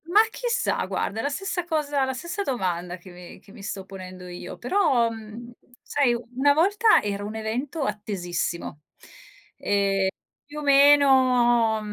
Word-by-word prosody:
Ma 375 +6 +5
chissà 485 0 -1
guarda, 215 - -3
è - - -2
la 285 - 0
stessa 360 +4 -3
cosa 300 -4 -1
la 265 - -2
stessa 340 +9 -5
domanda 180 - -2
che 180 +1 -14
mi 175 0 -12
che 200 - -19
mi 200 - -13
sto 195 -1 -5
ponendo 185 -1 -10
io, 175 0 -8
però, 255 - +2
mhmm, 225 +2 -10 0.3
sai 275 -4 +1 0.2
una 285 +3 +4
volta 405 +8 +4
era 205 -1 -3
un 210 +2 -6
evento 250 +8 -3
attesissimo, 175 - -4 0.2
ehm, - - -19 1.4
più 295 +1 -10
o - - -7
meno 260 -5 +5
240 Hz, 150 wpm, -24 LUFS, 200-290 Hz, 1.4 s, Ma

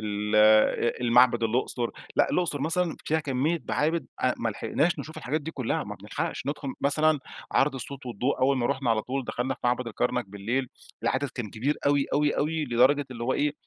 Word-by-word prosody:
ال 105 0 -1
أ 110 +2 +4
المعبد 120 0 +4
الأُقْصُر، 120 +1 0 0.3
لأ - - +3
الأُقْصُر 160 -6 0
مثلًا 165 +2 0
فيها 160 +1 +1
كمية 145 +3 -1
معابد، 160 +3 0
آآ، 130 - +2
ما 115 - -1
لحقناش 150 +9 0
نشوف 160 - -7
الحاجات 155 +1 -2
دي 155 - -6
كُلّها، 130 -7 -2
ما - - -6
بنلحقش - - -4
نُدخُل 145 -2 -3
مثلًا 155 +2 +3 0.3
عرض 135 +1 +3
الصوت 135 +1 -7
والضوء، 125 +3 -1
أول 135 +1 +3
ما 120 -2 +1
رُحنا 130 -3 0
على 110 -1 +2
طول، 135 +3 -3
دخلنا 125 +2 -2
في - - -26
معبد 125 0 +1
الكرنك 120 0 -1
بالليل، 115 +6 -2 0.3
العدد 140 +2 0
كان 120 -5 -6
كبير 135 +7 -1
أوي، 145 -1 +3
أوي، 145 0 +2
أوي، 155 +1 0
لدرجة 130 +3 +3
اللي 120 -2 -7
هو 130 - +1
إيه، 150 0 +1
130 Hz, 195 wpm, -27 LUFS, 120-145 Hz, 0.3 s, أ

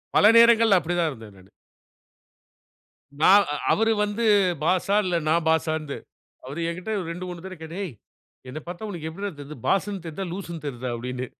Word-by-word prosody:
பல - - +6
நேரங்கள்ல 230 -3 +6
அப்படி 175 +1 -3
தான் 170 -2 +2
இருந்தேன் 110 -5 -12
நானு. 95 +1 -18 1.7
நா - - +6 0.2
அ - - -1 0.2
அவர் 225 +1 +3
வந்து 210 +3 -2 0.4
பாஸ்ஸா, 185 +4 +1
இல்ல 180 -1 0
நான் 165 +1 +2
பாஸ்ஸான்னு. 160 -2 0 0.5
அவர் 135 +5 -7
என்கிட்ட 180 +5 -5 0.2
2, 180 +2 -5
3 175 -1 -7
தடவை 190 -1 -7
கேட்டாரு, 165 +4 -7
"ஏய்! 165 -9 -7 0.5
என்னைப் 150 +5 -8
பார்த்தா 180 +5 -6
உனக்கு 165 -5 -5
எப்படிரா 200 +5 -5
தெரியுது? 145 0 -9
பாஸ்ன்னு 195 -2 0
தெரியுதா? 175 +4 -5
லூஸ்ஸுன்னு 170 -4 -7
தெரியுதா?" 130 -2 -4
அப்படீன்னு. 125 +2 -5
170 Hz, 165 wpm, -24 LUFS, 150-195 Hz, 1.7 s, பல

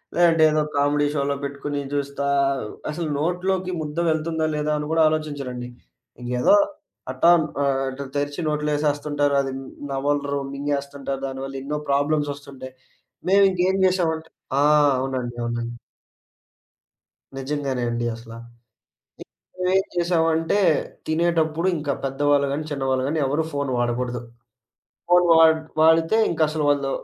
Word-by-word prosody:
లేదంటే 165 -2 +4
ఏదో 155 0 +2
కామెడీ‌షోలో 145 0 +1
పెట్టుకొని 140 +1 -4
జూస్తా, 140 0 -2 0.6
అసలు 160 +2 -3
నోట్లోకి 180 +3 -1
ముద్ద 150 +1 -6
వెళ్తుందా 160 0 0
లేదా 150 0 -1
అని 150 0 -4
గూడా 165 - +3
ఆలోచించరండి. 140 -6 -4 0.5
ఇంకేదో 125 - +3 0.6
అట్టా 130 +6 +3 0.3
ఆహ్, 135 -1 +1
అటు 135 +1 -5
తెరిచి 145 +3 -2
నోట్లో 150 0 -1
ఏసేస్తుంటారు. 145 -1 0
అది 135 -1 -4 0.4
నవలరు, 140 +1 -1
మింగేస్తుంటారు. 140 -1 -3
దానివల్ల 135 0 -6
ఎన్నో 150 +2 -3
ప్రాబ్లమ్సొస్తుంటాయి. 140 -2 -2 0.6
మేమింకేం 190 -1 +4
జేసామంటే 165 -3 0 0.3
ఆ! - - +4 0.3
అవునండి. 130 -2 -3
అవునండి. 120 0 -3 1.6
నిజంగానే 135 -2 -2
అండి 120 0 -2
అసల. 115 0 -12 0.9
ఇంక - - -11 0.4
మేమేం 190 +1 +3
జేసామంటే, 165 0 +1 0.5
తినేటప్పుడు 165 0 +1
ఇంకా 145 -2 -2
పెద్దవాళ్ళు 140 +1 +2
గానీ, 145 +2 -2
చిన్నవాళ్ళు 130 -2 0
గాని 155 +2 -1
ఎవరు 145 +4 0
ఫోను 140 -2 -2
వాడకూడదు. 120 0 -1 0.9
ఫోను 180 0 +5
వాడి 160 -1 +6 0.2
వాడితే 160 +5 +4
ఇంకసలు, 155 -2 0
వాళ్ళు 140 -1 +1
145 Hz, 115 wpm, -23 LUFS, 135-160 Hz, 1.6 s, వాడి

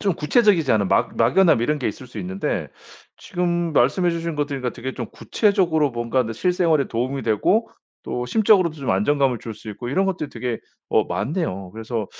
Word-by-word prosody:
좀 195 -3 +1
구체적이지 170 - +2
않은 100 -3 +2
막 - - +1
막연함 175 -11 +4
이런 150 +4 0
게 130 - -1
있을 125 +4 -8
수 110 - -9
있는데 95 +1 -3 0.5
지금 175 -2 -2
말씀해 160 +7 +3
주신 165 -1 -3
거 145 0 0
들으니까 135 -4 -3
되게 130 +2 -6
좀 120 - -5
구체적으로 175 - +1
뭔가 120 +2 0
느 115 -1 -5
실생활에 170 - +2
도움이 130 +4 -2
되고 115 - +1 0.3
또 125 0 -3
심적으로도 195 - +3
좀 140 -3 -3
안정감을 130 +6 +2
줄 110 0 -7
수 110 - -9
있고 120 +4 -7
이런 190 +9 +1
것들이 185 -6 -2
되게 120 -1 -4 0.3
어 - - +3
많네요. 100 - -3
그래서 110 -1 -4
140 Hz, 405 characters per minute, -22 LUFS, 115-170 Hz, 0.5 s, 막연함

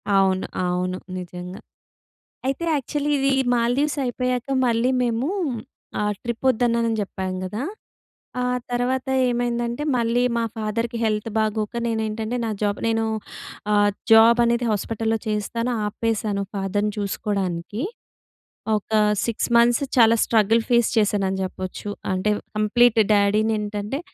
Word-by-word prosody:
అవును, 190 -1 +3 0.2
అవును. 180 +1 -1 0.2
నిజంగా. 180 +1 -7 0.9
అయితే 275 +5 -1
యాక్చువలీ 290 +2 -2
ఇది 275 0 +2 0.3
మాల్దీవ్స్ 260 +6 +1
అయిపోయాక 250 +1 -2 0.2
మళ్ళీ 235 +1 +2
మేము 240 +3 0 0.7
ఆహ్, 210 0 +1
ట్రిప్ 235 +1 -4
వద్దన్నానని 235 -2 +2
చెప్పాను 190 -2 -4
కదా! 205 +7 -4 0.8
ఆ - - 0 0.3
తర్వాత 250 +2 0 0.2
ఏమైందంటే 240 +1 -1
మళ్ళీ 235 +1 +1
మా 230 - +1
ఫాదర్‌కి 230 +2 -2
హెల్త్ 215 0 0
బాగోక 215 0 0
నేనేంటంటే 220 +1 -2
నా 225 - -1
జాబ్ 205 0 0
నేను 225 0 +1 0.7
ఆహ్, 205 0 +4 0.2
జాబ్ 225 +2 +7
అనేది 235 +1 +1
హాస్పిటల్‌లో 225 +2 -1
చేస్తాను. 230 +3 -1 0.2
ఆపేశాను 210 -2 -1
ఫాదర్‌ని 205 +2 -1
చూసుకోవడానికి. 200 0 -2 0.9
ఒక 210 - -7 0.3
6 230 +1 -1
మంత్స్ 235 +3 +4 0.2
చాలా 230 0 +6
స్ట్రగల్ 225 0 +3
ఫేస్ 235 -2 +4
చేశానని 195 -3 +1
చెప్పొచ్చు. 185 +2 -5 0.2
అంటే 185 +3 +1 0.3
కంప్లీట్ 230 +2 +4
డ్యాడిని 210 +2 +3
ఏంటంటే, 210 +5 -3
225 Hz, 115 wpm, -23 LUFS, 205-240 Hz, 0.9 s, జాబ్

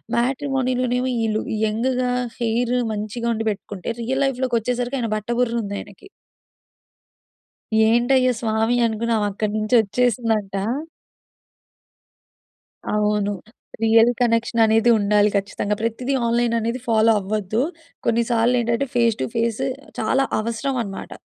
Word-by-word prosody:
మ్యాట్రిమోనీలోనేమో 255 -1 0
ఈళ్ళు 215 -1 0 0.2
యంగ్‌గా 250 +3 0 0.3
హెయిర్ 240 +1 0 0.2
మంచిగా 215 +3 -3
ఉండి 225 0 -3
పెట్టుకుంటే, 200 0 -5
రియల్ 265 +4 0
లైఫ్‌లోకొచ్చేసరికి 250 0 -1
ఆయన 230 -2 -2
బట్ట 215 +1 -6
బుర్రుంది 230 -4 -1
ఆయనకి... 205 - -12 1.8
"ఏంటయ్యా 255 +2 +3
స్వామి!" 225 +1 +1
అనుకొని 230 +1 -1
ఆమె 210 -1 0
అక్కడి 205 +1 -2
నుంచి 215 +3 +1
వచ్చేసిందంట. 220 -2 0 2.4
అవును. 210 -1 +1 0.5
రియల్ 225 +1 +5
కనెక్షన్ 230 -1 +2
అనేది 225 +2 +3
ఉండాలి 205 0 +3
ఖచ్చితంగా! 200 +1 -1
ప్రతిదీ 230 +4 -2
ఆన్‌లైన్ 235 0 +1
అనేది 230 +3 -2
ఫాలో 225 0 +4
అవ్వద్దు. 215 +3 -1 0.5
కొన్నిసార్లు 235 +1 +2
ఏంటంటే, 235 +4 0
ఫేస్ 235 -2 +3
టు - - +1
ఫేస్ 230 -1 0 0.4
చాలా 270 0 +2
అవసరమనమాట. 230 -2 -3
230 Hz, 105 wpm, -22 LUFS, 215-245 Hz, 2.4 s, రియల్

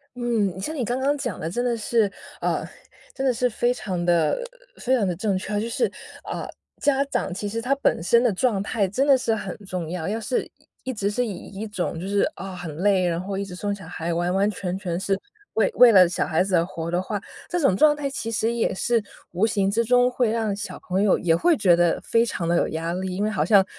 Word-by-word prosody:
嗯， 220 -7 -1
像 310 +11 -3
你 255 -6 -1
刚 245 +4 -1
刚 285 +2 +1
讲 245 -8 -4
的 160 - -3
真 245 +7 -2
的 240 -1 +1
是， 220 -2 +1 0.3
呃， - - 0 0.5
真 270 - -2
的 260 - +3
是 250 +1 +1
非 240 +2 +1
常 185 -7 -3
地 170 -3 +3 0.4
非 260 +1 +1
常 215 -6 +1
地 180 - -1
正 195 +2 0
确， 205 +2 -2
就 220 - -2
是 340 - 0 0.3
啊， - - -5 0.3
家 275 -1 +2
长 275 - -2
其 205 +2 -4
实 225 - -3
他 250 +4 +1
本 275 - +1
身 235 +6 +4
的 245 - +3
状 205 0 +1
态 205 -1 0
真 260 +9 0
的 275 -2 +7
是 250 -3 0
很 200 -4 -4
重 180 -4 -4
要， 170 -2 -3
要 215 +3 -1
是 250 +3 0
一 - - -19 0.3
一 260 - -3
直 200 -2 -1
是 245 +4 0
以 220 - -3
一 200 +4 -7
种 180 -5 -3
就 185 - -5
是， 200 0 +1
啊， 190 -1 -7
很 175 -4 -7
累， 190 0 +3
然 170 -1 0
后 195 +2 -4
一 200 - -1
直 180 -2 -8
送 205 +2 -2
小 195 -5 -9
孩， 170 0 -3
完 175 +1 0
完 195 +2 +2
全 185 -2 -4
全 180 -3 -3
是 195 0 0 0.4
为 - - +3
为 245 -2 +8
了 185 -4 +7
小 175 - -1
孩 170 +1 +2
子 195 -1 0
而 165 - +2
活 165 -2 -5
的 175 +1 +1
话， 205 +2 -3 0.3
这 355 - 0
种 275 - +3
状 300 +5 +5
态 295 -1 -3
其 230 -4 -4
实 225 0 0
也 235 -1 0
是 230 +4 +1 0.3
无 185 +6 +2
形 200 -2 +1
之 230 +3 +2
中 250 +1 +4
会 245 -2 +1
让 220 -2 0
小 205 - -6
朋 185 +2 +1
友 205 -2 +4
也 170 -2 +2
会 330 - +3
觉 195 -9 +4
得 175 -1 +2
非 230 0 +2
常 180 -6 -3
地 170 0 +2
有 - - +2
压 165 +1 -3
力， 185 0 -3
因 200 - -1
为 215 - +1
好 - - +1
像 200 -4 +5
205 Hz, 270 characters per minute, -24 LUFS, 180-235 Hz, 0.5 s, 为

